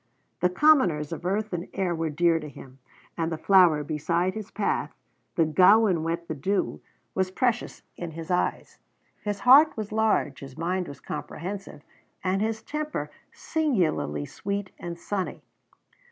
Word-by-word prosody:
The 180 Hz, -, +3 dB
commoners 180 Hz, -, +3 dB
of 170 Hz, +2 st, -4 dB
earth 210 Hz, +2 st, -1 dB
and 175 Hz, 0 st, -3 dB
air 190 Hz, -3 st, 0 dB
were 165 Hz, -1 st, -1 dB
dear 165 Hz, +2 st, +2 dB
to 150 Hz, -1 st, -7 dB
him; 135 Hz, -1 st, -13 dB, 0.4 s
and 165 Hz, 0 st, -1 dB
the 160 Hz, -, -2 dB
flower 175 Hz, -4 st, +5 dB
beside 165 Hz, +4 st, 0 dB
his 215 Hz, -2 st, -6 dB
path, 210 Hz, -, -2 dB, 0.4 s
the 165 Hz, -, +4 dB
gowan 185 Hz, +3 st, +5 dB
wet 165 Hz, +1 st, -2 dB
with 150 Hz, -4 st, -6 dB
dew, 195 Hz, +5 st, -1 dB, 0.3 s
was 190 Hz, -1 st, 0 dB
precious 240 Hz, +4 st, -1 dB
in 175 Hz, -, -5 dB
his 165 Hz, +1 st, -7 dB
eyes. 180 Hz, -, -1 dB, 0.4 s
His 205 Hz, -1 st, -3 dB
heart 275 Hz, +4 st, +7 dB
was 215 Hz, -2 st, -4 dB
large, 215 Hz, -10 st, +1 dB
his 135 Hz, 0 st, -10 dB
mind 180 Hz, +2 st, -1 dB
was 140 Hz, -, -9 dB
comprehensive, 190 Hz, -3 st, -6 dB, 0.4 s
and 190 Hz, +1 st, +1 dB
his 220 Hz, 0 st, -1 dB
temper 300 Hz, 0 st, -4 dB, 0.2 s
singularly 170 Hz, -, 0 dB
sweet 200 Hz, -, -4 dB
and 170 Hz, -1 st, -6 dB
sunny. 185 Hz, +2 st, -4 dB
180 Hz, 155 wpm, -26 LUFS, 160-205 Hz, 0.4 s, heart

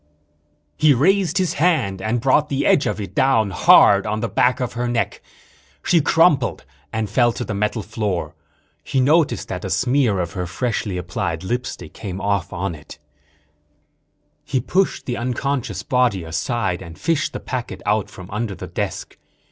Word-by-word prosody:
_ -, -, -42 dB, 0.7 s
He 150 Hz, -3 st, +5 dB
raised 185 Hz, +5 st, +2 dB
his 185 Hz, -4 st, +1 dB
hand 150 Hz, -, +1 dB
and 110 Hz, +5 st, 0 dB
brought 135 Hz, +4 st, +2 dB
the 140 Hz, 0 st, -1 dB
edge 145 Hz, -, +3 dB
of -, -, -2 dB
it 100 Hz, -, -6 dB
down 115 Hz, -6 st, +2 dB
hard 100 Hz, +2 st, +6 dB
on 105 Hz, +1 st, -1 dB
the -, -, -1 dB
back 125 Hz, +1 st, +2 dB
of 125 Hz, -2 st, -3 dB
her 120 Hz, +1 st, -2 dB
neck. 120 Hz, -1 st, -1 dB, 0.6 s
She 170 Hz, -2 st, +3 dB
crumpled 150 Hz, -4 st, +2 dB, 0.3 s
and 110 Hz, -1 st, -2 dB
fell 120 Hz, +4 st, +3 dB
to 100 Hz, -, -4 dB
the -, -, -4 dB
metal 105 Hz, +2 st, -1 dB
floor. 100 Hz, -8 st, -3 dB, 0.5 s
He 135 Hz, -, -1 dB
noticed 150 Hz, +4 st, +2 dB
that -, -, -4 dB
a -, -, -4 dB
smear 125 Hz, -6 st, +2 dB
of 85 Hz, -2 st, -2 dB
her 90 Hz, -3 st, -3 dB
freshly 105 Hz, -1 st, -2 dB
applied 85 Hz, -1 st, -3 dB
lipstick 125 Hz, +6 st, -4 dB
came 95 Hz, -3 st, -6 dB
off 100 Hz, -2 st, -1 dB
on 95 Hz, +1 st, -3 dB
it. 75 Hz, -2 st, -12 dB, 1.5 s
He 135 Hz, -, -1 dB
pushed 185 Hz, +10 st, 0 dB
the 120 Hz, -, -3 dB
unconscious 125 Hz, -5 st, -2 dB
body 120 Hz, -6 st, +1 dB
aside 90 Hz, +4 st, -2 dB
and 85 Hz, -3 st, -10 dB
fished 165 Hz, -3 st, 0 dB
the -, -, -5 dB
packet 120 Hz, -8 st, -5 dB
out 105 Hz, 0 st, +1 dB
from 90 Hz, -1 st, -11 dB
under 105 Hz, -1 st, -3 dB
the -, -, -7 dB
desk. -, -, -5 dB
115 Hz, 170 wpm, -21 LUFS, 95-135 Hz, 1.5 s, hard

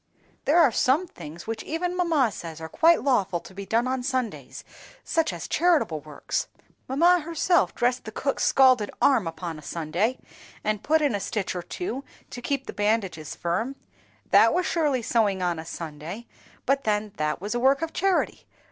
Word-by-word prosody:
"There 300 Hz, +4 st, +4 dB
are 310 Hz, -7 st, +6 dB
some 270 Hz, +10 st, +2 dB
things 165 Hz, -, -10 dB
which 225 Hz, 0 st, -4 dB
even 355 Hz, +3 st, -2 dB
mamma 325 Hz, -10 st, +2 dB
says 165 Hz, -4 st, -8 dB
are 160 Hz, -, -6 dB
quite 330 Hz, -, +4 dB
lawful 195 Hz, -10 st, +1 dB
to -, -, -13 dB
be 195 Hz, 0 st, -8 dB
done 230 Hz, +5 st, +1 dB
on 260 Hz, 0 st, -1 dB
Sundays, 215 Hz, -, -3 dB, 0.4 s
such 325 Hz, -1 st, +1 dB
as -, -, -6 dB
charitable 305 Hz, -, +2 dB
works. 150 Hz, 0 st, -4 dB, 0.4 s
Mamma 340 Hz, +7 st, +4 dB
herself 335 Hz, +2 st, +1 dB
dressed 245 Hz, +1 st, 0 dB
the 220 Hz, -, -6 dB
cook's 275 Hz, +5 st, -1 dB
scalded 255 Hz, -6 st, +5 dB
arm 240 Hz, -10 st, +3 dB
upon 165 Hz, -1 st, -5 dB
a -, -, -12 dB
Sunday, 170 Hz, -, -1 dB, 0.5 s
and 210 Hz, -1 st, -1 dB
put 315 Hz, +4 st, +2 dB
in 285 Hz, -5 st, +2 dB
a 205 Hz, -, -1 dB
stitch 195 Hz, 0 st, -3 dB
or 180 Hz, -, -2 dB
two 275 Hz, -, -5 dB, 0.3 s
to 245 Hz, -, -7 dB
keep 275 Hz, +1 st, -2 dB
the -, -, -7 dB
bandages 205 Hz, -7 st, -1 dB
firm. 220 Hz, +11 st, -2 dB, 0.6 s
That -, -, +6 dB
was 360 Hz, -, +1 dB
surely 295 Hz, -8 st, +1 dB
sewing 210 Hz, -5 st, +1 dB
on 175 Hz, -2 st, 0 dB
a 160 Hz, -, -7 dB
Sunday, 165 Hz, +8 st, -7 dB, 0.4 s
but 275 Hz, +1 st, +1 dB
then 210 Hz, -1 st, 0 dB
that 150 Hz, 0 st, -1 dB
was 205 Hz, +5 st, -4 dB
a 240 Hz, -, 0 dB
work 270 Hz, +4 st, +3 dB
of 325 Hz, -, -4 dB
charity. 385 Hz, -1 st, 0 dB
230 Hz, 185 wpm, -26 LUFS, 180-285 Hz, 0.6 s, are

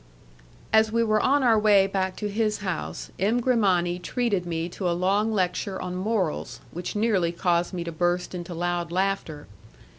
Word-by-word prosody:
As 220 Hz, 0 st, +5 dB
we 230 Hz, +1 st, +2 dB
were 215 Hz, -1 st, +2 dB
on 280 Hz, +1 st, +3 dB
our 230 Hz, -3 st, +5 dB
way 205 Hz, -2 st, +5 dB
back 190 Hz, -1 st, -1 dB
to 210 Hz, -, -3 dB
his 215 Hz, 0 st, -1 dB
house, 180 Hz, -3 st, -4 dB
M. 215 Hz, +6 st, +2 dB
Grimani 190 Hz, -8 st, +2 dB
treated 200 Hz, -3 st, -1 dB
me 165 Hz, 0 st, -2 dB
to 180 Hz, 0 st, -2 dB
a 170 Hz, -, 0 dB
long 200 Hz, +4 st, +1 dB
lecture 190 Hz, -1 st, -1 dB
on 180 Hz, 0 st, -4 dB
morals, 190 Hz, -3 st, -2 dB
which 175 Hz, +4 st, -5 dB
nearly 205 Hz, -6 st, +2 dB
caused 175 Hz, 0 st, 0 dB
me 180 Hz, -3 st, -4 dB
to 170 Hz, -, -5 dB
burst 175 Hz, +2 st, -1 dB
into 175 Hz, -1 st, -6 dB
loud 175 Hz, 0 st, -2 dB
laughter. 185 Hz, -5 st, -1 dB
190 Hz, 175 wpm, -25 LUFS, 175-215 Hz, -, As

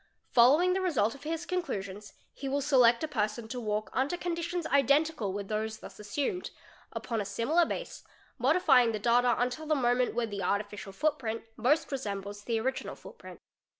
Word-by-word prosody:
Followin, 280 Hz, +9 st, +6 dB
g -, -, +3 dB
the 380 Hz, -, 0 dB
result 285 Hz, -, +1 dB
of 280 Hz, -, -13 dB
his 330 Hz, +2 st, -3 dB
conclusions 210 Hz, -, -4 dB, 0.2 s
he 275 Hz, -, -5 dB
will 280 Hz, +1 st, 0 dB
select 255 Hz, -3 st, +4 dB
a -, -, 0 dB
person 220 Hz, -4 st, -2 dB
to 250 Hz, +2 st, -5 dB
walk 215 Hz, -2 st, -2 dB
under 275 Hz, +7 st, 0 dB
con 350 Hz, -1 st, -2 dB
ditions 340 Hz, 0 st, -3 dB
identical 280 Hz, -3 st, +2 dB
with 200 Hz, 0 st, -5 dB
those 220 Hz, +1 st, -2 dB
thus -, -, -12 dB
assumed, 285 Hz, -, -3 dB, 0.4 s
upon 230 Hz, -3 st, -3 dB
a -, -, -1 dB
similar 230 Hz, -, +1 dB
base, -, -, -5 dB, 0.4 s
modifying 270 Hz, -2 st, +4 dB
g 230 Hz, -, 0 dB
the 215 Hz, -, -2 dB
data 240 Hz, +2 st, +3 dB
until 250 Hz, +6 st, -2 dB
the 310 Hz, -, +2 dB
moment 245 Hz, -2 st, +1 dB
when 230 Hz, -2 st, -1 dB
the 200 Hz, -1 st, -4 dB
artificial 205 Hz, +1 st, -2 dB
footprint 240 Hz, -1 st, -1 dB
most 295 Hz, +6 st, +1 dB
resembles 205 Hz, -5 st, -4 dB
the 230 Hz, -2 st, 0 dB
original 260 Hz, +4 st, -3 dB
footprint. -, -, -12 dB
245 Hz, 185 wpm, -30 LUFS, 215-300 Hz, 0.4 s, Followin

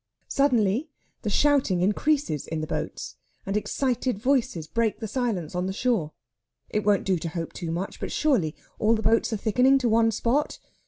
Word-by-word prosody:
Suddenly 250 Hz, 0 st, +2 dB, 0.3 s
the 215 Hz, -, -2 dB
shouting 260 Hz, -7 st, +2 dB
increases 210 Hz, -, +1 dB
in 160 Hz, -, -3 dB
the 155 Hz, -, -2 dB
boats, -, -, -5 dB, 0.3 s
and 195 Hz, -, -2 dB
excited 245 Hz, +2 st, -1 dB
voices 235 Hz, -, 0 dB
break 220 Hz, +7 st, 0 dB
the 220 Hz, -, -4 dB
silence 215 Hz, -, -2 dB
on 180 Hz, +1 st, -1 dB
the 190 Hz, -, -2 dB
shore. 205 Hz, -9 st, 0 dB, 0.6 s
It 210 Hz, -, 0 dB
won't 205 Hz, -1 st, +3 dB
do 185 Hz, -3 st, +1 dB
to 165 Hz, -, -4 dB
hope 165 Hz, 0 st, -5 dB
too 170 Hz, -, -5 dB
much, 175 Hz, +4 st, -4 dB
but -, -, -4 dB
surely 220 Hz, -, +1 dB, 0.2 s
all 220 Hz, +2 st, +3 dB
the 220 Hz, -, -3 dB
boats 230 Hz, +1 st, +2 dB
are 220 Hz, -, 0 dB
thickening 250 Hz, +6 st, +3 dB
to 255 Hz, -3 st, 0 dB
one 225 Hz, 0 st, +4 dB
spot.... 240 Hz, +6 st, 0 dB
215 Hz, 180 wpm, -26 LUFS, 185-250 Hz, 0.6 s, one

